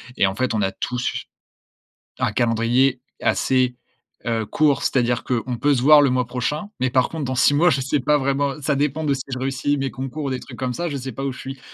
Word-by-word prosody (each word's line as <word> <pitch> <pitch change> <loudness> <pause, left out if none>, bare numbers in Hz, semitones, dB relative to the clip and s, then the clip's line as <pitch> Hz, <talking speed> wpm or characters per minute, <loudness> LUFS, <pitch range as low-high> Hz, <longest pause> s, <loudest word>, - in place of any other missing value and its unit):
et 100 - +3
en 95 - -3
fait, 130 +1 -1
on 110 - 0
a 95 -1 +1
tous 125 +5 -3 0.9
un - - +1
calendrier 120 +3 +2 0.2
assez, 130 -1 +2 0.5
heu, 115 -1 0
court, 145 +6 +2
c'est-à-dire 120 -2 +1
qu'on 125 0 -2
peut 145 +4 +2
se 125 - 0
voir 145 +2 +7
le 135 - +3
mois 125 -1 0
prochain, 130 +10 -3
mais 130 0 0
par 130 -1 +2
contre 160 -3 -4
dans 130 - -2
6 145 +3 +4
mois, 175 +3 +4
je 135 - +1
sais 140 +3 0
pas 150 +3 +2
vraiment. 140 +2 -1
Ça 145 0 0
dépend 150 +2 0
de 140 -2 +1
si 130 - -5
je 130 - -4
réussis 135 +2 -1
mes 135 0 -1
concours 135 +3 -5
ou - - -1
des 130 -1 -2
trucs - - -11
comme 130 -1 -2
ça, 175 0 -2
je 145 - -3
sais 130 0 -5
pas 135 +4 -5
où 135 - -1
je 130 - -10
suis. 135 0 -7
130 Hz, 245 wpm, -22 LUFS, 125-140 Hz, 0.9 s, voir